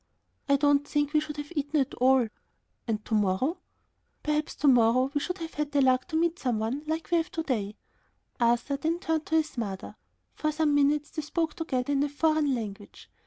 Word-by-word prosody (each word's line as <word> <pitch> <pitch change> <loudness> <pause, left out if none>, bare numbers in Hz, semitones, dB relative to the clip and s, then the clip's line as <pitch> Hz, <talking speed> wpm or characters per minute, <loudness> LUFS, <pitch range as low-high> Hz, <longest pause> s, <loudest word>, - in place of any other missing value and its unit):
"I 280 - +6
don't 290 0 +3
think 290 0 0
we 305 - +5
should 300 0 -6
have 295 +3 -6
eaten 295 +1 0
at 270 -1 0
all." 255 -1 +4 0.6
"And 215 -2 -2
to 230 - -4
morrow?" 215 - +1 0.6
"Perhaps 300 0 -1
to 295 - 0
morrow 250 +1 +4
we 290 - +1
should 360 +4 -3
have 330 -2 -6
had 295 -1 -2
the 285 - +4
luck 255 -1 +3
to 330 - -5
meet 335 +2 +1
some 245 -4 0
one 225 +6 -2
like 320 +2 -3
we 345 - +4
have 330 +1 -1
to 325 - -2
day." 210 -8 -2 0.6
Arthur 240 +4 +2
then 320 +4 -1
turned 320 -2 -2
to 320 - 0
his 310 -5 0
mother. 195 -4 -5 0.4
For 305 - -1
some 305 -1 +1
minutes 290 +1 +2
they 310 - -3
spoke 320 +1 -2
together 285 -4 -2
in 275 - +2
a 290 - +1
foreign 300 -1 +2
language. 205 -3 -8
290 Hz, 210 wpm, -28 LUFS, 250-310 Hz, 0.6 s, I